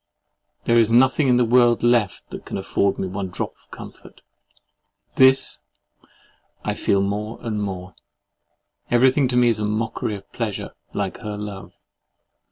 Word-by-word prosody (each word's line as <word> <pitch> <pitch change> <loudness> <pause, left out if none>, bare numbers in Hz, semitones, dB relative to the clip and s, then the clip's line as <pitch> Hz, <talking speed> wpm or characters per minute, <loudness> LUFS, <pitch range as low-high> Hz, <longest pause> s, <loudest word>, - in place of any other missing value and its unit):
There 115 0 +3
is 115 -1 +3
nothing 130 +4 +4
in 125 -1 +4
the 125 - +3
world 120 0 +3
left 120 -4 +1
that - - -8
can - - -6
afford 100 0 0
me 95 - -3
one 95 +1 -4
drop 90 - -5
of - - -27
comfort—THIS 130 0 -1 1.1
I - - 0
feel 100 - +1
more 105 +3 -3
and 110 -3 -3
more. 95 -2 -5 1.0
Everything 130 +3 +4
is - - -1
to 125 - 0
me 120 -1 +5
a 105 -2 -2
mockery 110 0 -2
of 100 0 -13
pleasure, 110 -4 -4 0.2
like - - -4
her 105 -1 -6
love. 105 -2 -8
110 Hz, 150 wpm, -22 LUFS, 100-120 Hz, 1.1 s, me